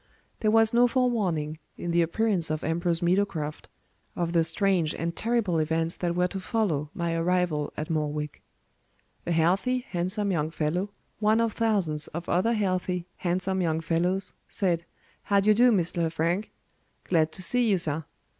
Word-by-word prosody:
There 215 - +2
was 225 +1 +4
no 240 +1 +5
forewarning, 195 - 0 0.2
in 175 - -3
the 170 0 +3
appearance 175 0 +1
of 155 0 -2
Ambrose 170 +1 0
Meadowcroft, 175 -4 -1 0.5
of 170 -1 -2
the 165 -1 +4
strange 170 -1 +1
and 170 +1 -3
terrible 225 -8 +1
events 165 +2 0
that 170 -1 -1
were 180 0 +2
to 195 - -4
follow 185 - -1
my 170 -1 -1
arrival 165 -3 0
at 155 +2 -3
Morwick. 150 -1 -2 0.9
A - - 0
healthy, 195 +10 +1
handsome 190 +3 -1
young 155 -3 0
fellow, 165 +5 -1 0.3
one 215 +1 +3
of 230 -2 +1
thousands 190 -10 +1
of 170 - -6
other 190 +7 +2
healthy, 185 -4 -1
handsome 185 +1 -1
young 160 -2 0
fellows, 175 +4 -1 0.2
said, 170 -4 0 0.4
"How 200 -1 +3
d'ye 210 +2 +4
do, 245 +3 +5
Mr. 180 -4 0
Lefrank? 170 +5 0 0.5
Glad 160 -3 +2
to 185 - -3
see 245 +3 +2
you, 195 - +4
sir. 160 -2 0
175 Hz, 160 wpm, -27 LUFS, 165-205 Hz, 0.9 s, no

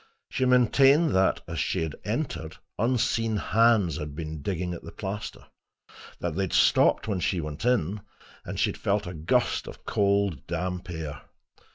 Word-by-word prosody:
She 130 - 0
maintained 135 +5 +5
that, 95 +1 +2
as - - -4
she 80 - 0 0.2
entered, - - -3 0.2
unseen 115 -1 +1
hands 110 -8 +3
had 75 -2 -6
been 80 -1 -5
digging 90 +2 -2
at 85 - -7
the 85 - -10
plaster; 105 +1 -6 0.7
that 85 -2 -2
they 95 - -1
had 90 - -6
stopped - - +4
when 100 -4 -1
she 90 +1 0
went 75 +5 -5
in, 105 -5 +1 0.4
and - - -5
she - - +2
had - - -10
felt 100 +1 0
a 90 - -6
gust 80 -1 0
of - - -11
cold 100 -7 +1
damp 90 +2 -3
air. 80 -4 -5
95 Hz, 165 wpm, -27 LUFS, 80-110 Hz, 0.7 s, maintained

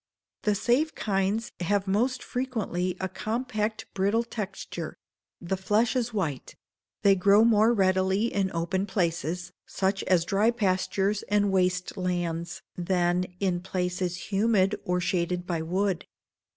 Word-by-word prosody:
The 210 -1 +1
safe 250 +9 +1
kinds 200 +2 0
have 200 +2 0
most 245 +6 +1
frequently 205 -8 -2
a 190 - -1
compact, 215 +2 -2
brittle 200 +4 +2
texture; 210 -4 -6 0.4
the 180 +2 -2
flesh 210 +6 +1
is 245 -2 0
white; 165 - -3 0.5
they 200 - +7
grow 200 +3 +5
more 225 0 +5
readily 190 -1 +2
in 195 -1 0
open 175 +4 -1
places, 175 -2 -1 0.2
such 195 0 0
as 175 -3 +3
dry 200 +5 +3
pastures 200 -2 0
and 205 -1 +3
waste 180 0 +1
lands, 175 -2 -2
than 175 0 +1
in 185 -3 +1
places 180 0 -3
humid 200 -1 +3
or 180 -2 +1
shaded 180 0 -1
by 170 -3 -2
wood. 185 +2 -1
190 Hz, 130 wpm, -27 LUFS, 180-210 Hz, 0.5 s, they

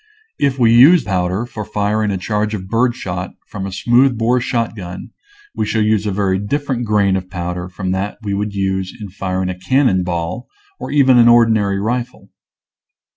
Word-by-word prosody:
If 140 -2 +1
we 115 -3 +4
use 150 +8 +7
powder 95 +2 -1
for 110 -3 -7
firing 105 0 -1
a 100 - -1
charge 105 +3 -2
of 95 -2 -7
birdshot 115 -6 -2
from 95 -1 -6
a - - -6
smooth 120 +5 +2
bore 120 +2 +1
shotgun 110 -7 -4 0.4
we - - -2
shall 110 -1 +1
use 105 -1 +1
a - - 0
very 95 -1 0
different 130 +3 -2
grain 100 -3 +2
of 95 -1 -4
powder 90 0 -5
from 95 0 -4
that 95 +2 -3
we 100 -1 -2
would 100 +1 -3
use 95 0 -2
in 105 -2 -7
firing 95 -1 -3
a 90 -1 -6
cannon 125 -2 +2
ball 90 +6 -4 0.3
or - - -6
even 135 -4 +4
an 120 - +6
ordinary 110 -4 +4
rifle. 120 -1 -4
105 Hz, 180 wpm, -17 LUFS, 95-120 Hz, 0.4 s, use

